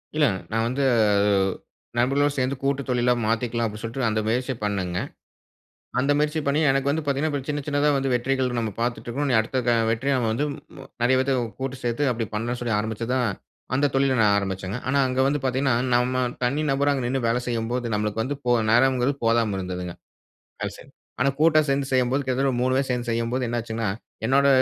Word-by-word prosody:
இல்ல. 155 -1 +4 0.3
நான் 115 +1 +1
வந்து 130 +4 -1 1.1
நண்பர்களுடன் 140 +4 +2
சேந்து 130 +1 0
கூட்டு 140 0 +1
தொழிலா 125 0 +3
மாத்திக்கலாம் 115 +1 0
அப்டினு 105 0 -8
சொல்ட்டு, 115 +4 -4
அந்த 110 0 0
முயற்சி 125 +4 0
பண்ணங்க. 95 -4 -1 1.0
அந்த 140 +3 +3
முயற்சி 150 +1 +1
பண்ணி 140 +2 +2
எனக்கு 135 +1 +1
வந்து 160 +3 0
பாத்தீங்கனா, 145 +1 0
சின்ன 145 -1 -1
சின்னதா 145 0 +2
வந்து 135 -1 0
வெற்றிகள் 130 +1 +1
நம்ம 110 -2 -2
பாத்துட்டுருக்குறோம். 120 +4 -2
இனி 125 - +3
அடுத்துக்கான 115 0 +1
வெற்றிய 130 +5 0 0.2
வந்து 120 +6 0
ம் - - -8 0.2
ம - - -10 0.2
நெறய 125 +2 +4
பேத்த 135 +1 +1 0.3
கூட்டு 135 0 -3
சேத்து 120 +4 0
அப்டி 115 -1 -3
பண்ணலாம்னு 120 +3 -2
சொல்லி 115 -3 0
ஆரம்பிச்சது 110 +2 -3
தான் 125 -3 +1 0.5
அந்த 140 +2 +3
தொழில 135 -1 +2
நான் 105 -2 +4
ஆரம்பிச்சேங்க. 95 +1 -3
ஆனா 140 +2 +2
அங்கு 130 +1 +1
வந்து 145 +1 0
பாத்தீங்கனா, 130 -1 +1 0.2
நம்ம 125 +1 +2 0.2
தனி 135 +5 +1
நபர் 140 +1 +2
அங்க 135 -2 -1
நின்னு 130 -1 -1
வேலை 120 +2 +1
செய்யும் 115 -2 -2
போது, 125 -1 -1
நமக்கு 105 +1 -1
வந்து 145 +4 -3
போ 120 - +2 0.2
நேரம்ங்குறது 130 +3 +3
போதாம 115 -3 +2
இருந்ததுங்க. 90 -1 -5 0.7
அதுசரி, - - -6 0.3
ஆனா 130 +2 +3
கூட்டா 155 0 +5
சேந்து 135 0 0
செய்யும்போது 130 +2 +2
கிட்டத்தட்ட 130 +1 +1
3 130 +1 +2
பேரு 135 0 -1
சேந்து 120 -1 -2
செய்யும்போது, 115 +2 -1
என்ன 120 - -1
ஆச்சுங்கனா 115 -2 -3 0.4
என்னோட 140 +2 +4
125 Hz, 185 wpm, -24 LUFS, 115-135 Hz, 1.1 s, கூட்டா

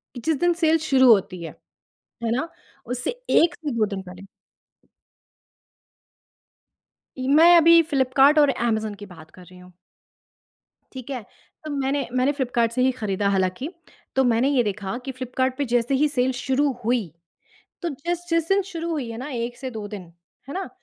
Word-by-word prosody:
कि 245 - -7
जिस 320 -1 +2
दिन 350 0 +3
सेल 320 +1 +5
शुरू 260 -3 +5
होती 195 -4 +1
है, 165 - -8 0.7
है 225 - 0
ना 310 +6 -2 0.4
उससे 250 +1 -2 0.2
1 335 - +4
से 300 -4 -5
2 225 -2 +1
दिन 200 -2 -5
पहले 185 0 -12 2.9
इ 255 0 -4
मैं 340 +2 +7
अभी 335 0 +7
फ्लिपकार्ट 275 +2 +4
और 290 -2 +5
अमेज़न 220 -4 -1
की 205 +1 -10
बात 160 -4 -14
कर 185 - -16
रही 180 0 -16
हूँ। 180 0 -15 1.2
ठीक 260 0 -9
है, 255 -3 -4 0.4
तो 305 - -5
मैंने 275 -1 -1
मैंने 255 +3 +2
फ्लिपकार्ट 245 -5 0
से 250 +2 -1
ही 260 0 +3
खरीदा 205 -5 -2
हालाँकि, 190 - -1 0.5
तो 265 - +3
मैंने 245 +2 +2
ये 260 -4 +2
देखा 205 +1 -4
कि 265 - -3
फ्लिपकार्ट 255 0 -2
पे 285 - -1
जैसे 240 +2 +2
ही 300 +3 +3
सेल 260 -2 +1
शुरू 275 +2 +1
हुई, 235 -4 +1 0.8
तो 345 - -1
जिस 345 +5 -4
जिस 330 -1 +1
दिन 390 0 +3
शुरू 335 0 -4
हुई 285 -8 -3
है 225 - -6
ना, 260 +4 -6
1 240 -1 -4
से 260 0 -6
2 220 -3 -6
दिन 205 -3 -7 0.5
है - - -6
ना? 380 0 -4
255 Hz, 180 wpm, -23 LUFS, 220-290 Hz, 2.9 s, मैं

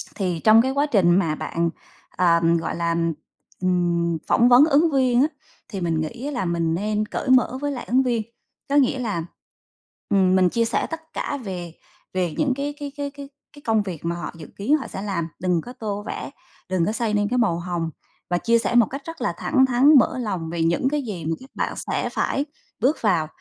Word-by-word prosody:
thì 180 -4 -1
trong 220 +1 +7
cái 260 - 0
quá 280 +2 +1
trình 200 -12 +3
mà 160 -5 0
bạn, 170 +2 -1 0.5
ờ, 170 -2 +4 0.2
gọi - - -3
là, 170 0 0 0.7
ừm, 170 -2 +1
phỏng 240 +1 +4
vấn 245 +4 +8
ứng 315 +1 +3
viên 255 -3 +3
á 290 - +4 0.4
thì 195 -5 -5
mình 165 -2 0
nghĩ 230 - -5
á 295 - -2
là 215 -8 -2
mình 170 -1 0
nên 210 +4 -1
cởi 255 - -4
mở 255 0 +4
với 290 - -1
lại 255 -3 -5
ứng 260 +2 +3
viên, 240 -3 0 0.5
có 280 - +1
nghĩa 265 -2 +3
là, 205 -9 -2 0.9
ừm, 190 -2 +3
mình 185 -1 +4
chia 230 +4 +1
sẻ 225 - 0
tất 325 0 -8
cả 285 - -3
về 175 -4 -6 0.4
về 180 -3 -1
những 280 -4 +2
cái 285 +1 -3
cái 285 -1 -5
cái 285 -1 -3
cái 280 -1 -10 0.2
cái 290 - -14
công 220 -2 +3
việc 175 -5 -7
mà 170 - -1
họ 175 - -5
dự 155 - -10
kiến 265 +10 +2
họ 270 - -6
sẽ 195 - -6
làm, 190 -5 -2
đừng 180 -2 +1
có 245 - -10
tô 205 -4 -4
vẽ, - - -5 0.4
đừng 185 -3 +1
có 210 - 0
xây 225 -1 -1
nên 205 0 +2
cái 250 - 0
màu 190 -8 +2
hồng 175 -2 -3 0.4
và 175 - +2
chia 230 +5 +3
sẻ 230 +1 -1
một 240 -2 +7
cách 275 +2 -6
rất 330 0 -8
là - - 0
thẳng 265 -3 +3
thắn 260 +3 +5
mở 245 - +1
lòng 185 -9 -3
về 170 -1 -1
những 170 +10 +2
cái 295 +1 -1
gì 190 -9 -6
mà 165 +1 0
các 265 - -14
bạn - - -1
sẽ - - -2
phải 280 - -1 0.3
bước 260 +8 +2
vào, 175 -8 +2
215 Hz, 225 wpm, -23 LUFS, 175-260 Hz, 0.9 s, vấn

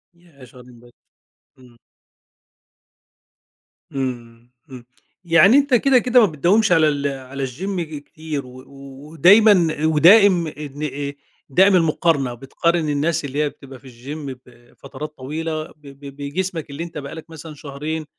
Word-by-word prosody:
ياه! 170 -6 -20
شهرين 125 -1 -17
ب 120 +1 -19 0.7
إمم. 125 -2 -19 2.1
إمم، 120 -3 -6 0.2
إمم. 125 -3 -11 0.4
يعني 175 +8 +5
أنت 285 -1 +1
كده، 260 +2 +4
كده 250 +1 +3
ما 230 - +6
بتداومش 185 +8 +2
على 160 -3 +4
ال 145 -1 -2
على 135 0 -5
الgym 185 +9 -5
ج 160 -3 -5
كتير 150 -1 -7
و 125 0 -13 0.5
ودايمًا 180 -3 +4
ودائم 175 +3 +5
إن 150 -1 -8
آآ 140 -1 -4 0.4
دائم 190 +8 +4
المقارنة، 160 -6 +1
بتقارن 155 +6 -1
الناس 150 +2 -1
اللي 140 +2 -2
هي 150 - -1
بتبقى 135 -2 -14
في 130 - -17
الgym 135 +4 -8
بفترات 130 +5 -12
طويلة 155 +4 -4
ب - - -16
ب 140 -1 -12
بجسمك 160 +3 -4
اللي 140 +4 -6
أنت 170 -2 -9
بقى 140 -1 -7
لك 160 0 -11
مثلًا 160 -1 -10
شهرين 150 +2 -6
150 Hz, 140 wpm, -20 LUFS, 135-170 Hz, 2.1 s, ما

